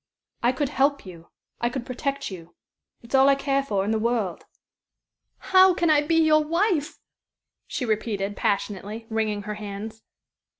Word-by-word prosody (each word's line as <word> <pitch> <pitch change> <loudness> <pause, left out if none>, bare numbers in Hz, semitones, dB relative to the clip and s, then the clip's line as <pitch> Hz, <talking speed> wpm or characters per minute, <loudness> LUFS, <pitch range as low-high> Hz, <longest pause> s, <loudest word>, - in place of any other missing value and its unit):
I 240 - +3
could 260 +1 -2
help 280 -2 +1
you. 170 -3 -12 0.3
I 240 - 0
could 245 -1 -5
protect 275 0 -3
you. 170 -2 -10 0.5
It's 235 - -14
all 270 +1 +6
I 275 - +5
care 275 0 0
for 200 -8 -1
in 210 - -1
the 220 - +1
world." 225 -6 -1 0.9
"How 375 -1 +5
can 340 -3 +2
I 295 -1 +5
be 315 +3 0
your 310 -1 +4
wife?" 335 -1 0 0.7
she 255 - -3
repeated, 205 -2 -2
passionately, 205 +3 -2
wringing 215 -2 -1
her 210 +1 -4
hands. 210 +2 -7
240 Hz, 160 wpm, -25 LUFS, 205-285 Hz, 0.9 s, all